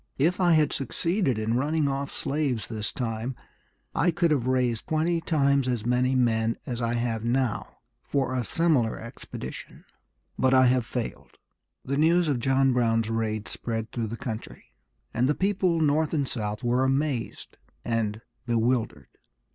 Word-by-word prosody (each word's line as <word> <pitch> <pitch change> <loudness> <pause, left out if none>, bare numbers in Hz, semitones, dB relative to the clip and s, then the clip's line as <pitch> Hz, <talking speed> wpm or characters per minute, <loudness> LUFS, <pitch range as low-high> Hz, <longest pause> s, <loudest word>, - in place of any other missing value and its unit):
If 170 +7 +2
I 175 -2 +5
had 155 -2 +3
succeeded 155 - 0
in 110 +1 -1
running 150 +3 +1
off 140 0 -2
slaves 135 -6 -1
this 110 -2 -3
time, 120 +1 -3 0.6
I 175 - +2
could 170 -1 +2
have 130 -5 +1
raised 125 -3 0
twenty 165 +2 +1
times 140 -5 +2
as 120 -4 -1
many 125 +2 +2
men 115 -2 +2
as 120 -1 -4
I 115 0 0
have 115 -2 -1
now 120 -1 -1 0.2
for 135 -2 -1
a 125 -1 0
similar 145 -5 +1
expedition. 115 +1 -9 0.5
But 130 0 +4
I 130 0 +6
have 125 -2 +2
failed." 125 -3 -5 0.5
The 140 +1 -1
news 165 +3 +4
of 135 -4 +1
John 135 +1 +3
Brown's 115 -2 +1
raid 110 -2 -1
spread 115 -1 -4
through 115 -2 -2
the 115 +2 -5
country, 110 -3 -7 0.4
and 125 +3 +2
the 150 - +2
people 185 -3 +1
North 155 +1 +2
and 140 -3 0
South 105 -3 -4
were 120 +2 +2
amazed 135 -2 -1 0.3
and 110 -2 -1 0.3
bewildered. 115 - 0
130 Hz, 155 wpm, -26 LUFS, 115-145 Hz, 0.6 s, I